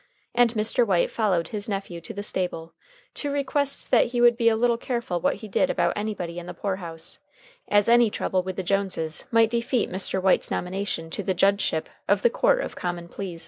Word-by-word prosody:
And 240 -1 +3
Mr. 220 +3 +2
White 190 -6 +1
followed 190 -7 0
his 210 0 -3
nephew 195 -4 -4
to - - -8
the 205 - -6
stable 170 -5 -3 0.4
to 290 - -3
request 280 0 -1
that 240 - +5
he 240 0 -3
would 240 0 +6
be 230 -1 +3
a 225 - +2
little 235 +1 +1
careful 235 -9 -2
what - - +1
he 215 +2 -9
did 270 +7 +1
about - - +1
anybody 190 -5 -4
in 175 - -10
the - - -7
poor 195 -2 -2
house, 165 -3 -3 0.5
as 205 -1 +3
any 235 -1 +5
trouble 190 -2 -1
with 185 0 -5
the 190 - -3
Joneses 180 -4 -1
might 230 -1 +4
defeat 235 -1 0
Mr. 190 +1 +2
White's 190 0 +2
nomination 180 -3 -3
to 205 - -3
the 190 -1 -1
judgeship 195 -3 +1 0.2
of - - +2
the 480 - +4
Court - - +2
of - - -5
Common 175 -1 -4
Pleas. 180 -3 -6
200 Hz, 210 wpm, -25 LUFS, 180-235 Hz, 0.5 s, would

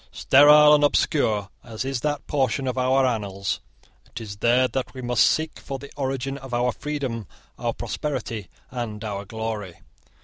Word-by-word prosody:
Sterile 150 +2 +7
and 150 -1 +4
obscure 110 -8 +2
as 115 +1 -5
is 135 -2 -2
that 145 -1 -2
portion 135 -1 0
of 125 - -1
our 130 +1 +3
annals, 100 -5 -2 0.5
it - - -8
is 105 -3 -8
there 120 +4 +3
that 130 0 -4
we 130 - -6
must 120 -3 +3
seek 155 0 -1
for 135 - -6
the 140 +1 -11
origin 135 0 -3
of 130 -2 -5
our 125 +1 +1
freedom, 130 - -4 0.3
our - - -1
prosperity, 120 -7 -4 0.2
and 115 -4 -5
our 100 -2 -4
glory. 110 -4 -5
125 Hz, 165 wpm, -24 LUFS, 110-135 Hz, 0.5 s, Sterile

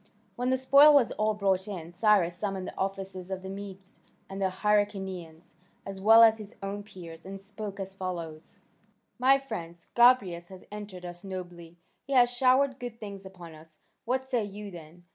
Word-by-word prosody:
When 245 +1 -1
the 260 - +2
spoil 280 +3 +7
was 260 -5 +4
all 215 0 0
brought 195 -1 0
in, 175 -5 -7
Cyrus 185 -2 +3
summoned 195 0 -3
the - - -8
officers 190 -1 -4
of 190 -1 -5
the 190 - -6
Medes 195 -1 -10 0.3
and 195 +1 -7
the 190 - +2
Hyrcanians, 190 -4 -2 0.3
as 195 -1 -7
well 225 +3 +8
as 220 -1 +5
his 210 +1 -10
own 200 +1 -4
peers, 170 -5 -11
and 195 +1 -8
spoke 200 0 -8
as 195 0 -6
follows: 170 -4 -6 0.6
"My 265 +2 +5
friends, 170 -11 -8
Gobryas 220 -9 +4
has 185 0 -13
entertained 205 -4 -8
us 175 +1 -9
nobly; 175 -3 -8 0.2
he 275 - -6
has 245 -2 +5
showered 260 +2 +3
good 240 -2 -7
things 200 -2 -8
upon 175 -3 -12
us. 155 0 -16 0.3
What 260 +2 -1
say 245 -4 0
you 205 0 -8
then? 170 0 -12
195 Hz, 180 wpm, -28 LUFS, 180-220 Hz, 0.6 s, well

